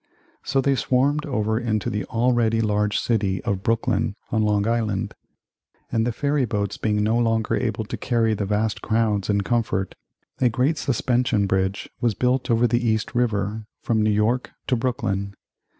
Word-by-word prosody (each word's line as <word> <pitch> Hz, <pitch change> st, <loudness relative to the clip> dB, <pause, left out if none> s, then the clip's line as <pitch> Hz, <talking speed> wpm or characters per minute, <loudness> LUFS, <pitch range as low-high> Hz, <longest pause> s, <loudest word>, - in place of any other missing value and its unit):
So 135 Hz, -, 0 dB
they 140 Hz, +1 st, +2 dB
swarmed 135 Hz, +4 st, +1 dB
over 110 Hz, -4 st, 0 dB
into 110 Hz, -4 st, -1 dB
the 105 Hz, -, -2 dB
already 115 Hz, -1 st, +1 dB
large 105 Hz, -1 st, +1 dB
city 100 Hz, -5 st, 0 dB
of 100 Hz, -2 st, -1 dB
Brooklyn, 115 Hz, -2 st, 0 dB, 0.2 s
on 110 Hz, -, +2 dB
Long 105 Hz, -1 st, +1 dB
Island. 110 Hz, -4 st, -1 dB, 0.8 s
And 115 Hz, 0 st, +1 dB
the -, -, +1 dB
ferry 140 Hz, +3 st, 0 dB
boats 105 Hz, -3 st, -2 dB
being 105 Hz, -1 st, 0 dB
no 110 Hz, +3 st, +2 dB
longer 115 Hz, -2 st, +1 dB
able 110 Hz, -2 st, -1 dB
to -, -, -5 dB
carry 115 Hz, -3 st, +1 dB
the 100 Hz, -2 st, -2 dB
vast 105 Hz, +1 st, 0 dB
crowds 110 Hz, -3 st, 0 dB
in 100 Hz, -1 st, +2 dB
comfort, 100 Hz, -4 st, -1 dB, 0.5 s
a 125 Hz, -, +4 dB
great 130 Hz, +7 st, +1 dB
suspension 125 Hz, -4 st, +1 dB
bridge 95 Hz, 0 st, -1 dB
was 115 Hz, -4 st, +1 dB
built 125 Hz, +3 st, 0 dB
over 115 Hz, +1 st, +3 dB
the 120 Hz, +1 st, +1 dB
East 110 Hz, -2 st, 0 dB
River 110 Hz, -3 st, -1 dB, 0.2 s
from 110 Hz, -2 st, +1 dB
New 105 Hz, -, +2 dB
York 110 Hz, +4 st, +1 dB, 0.2 s
to 130 Hz, -, +1 dB
Brooklyn. 100 Hz, -6 st, -2 dB
110 Hz, 165 wpm, -23 LUFS, 105-120 Hz, 0.8 s, a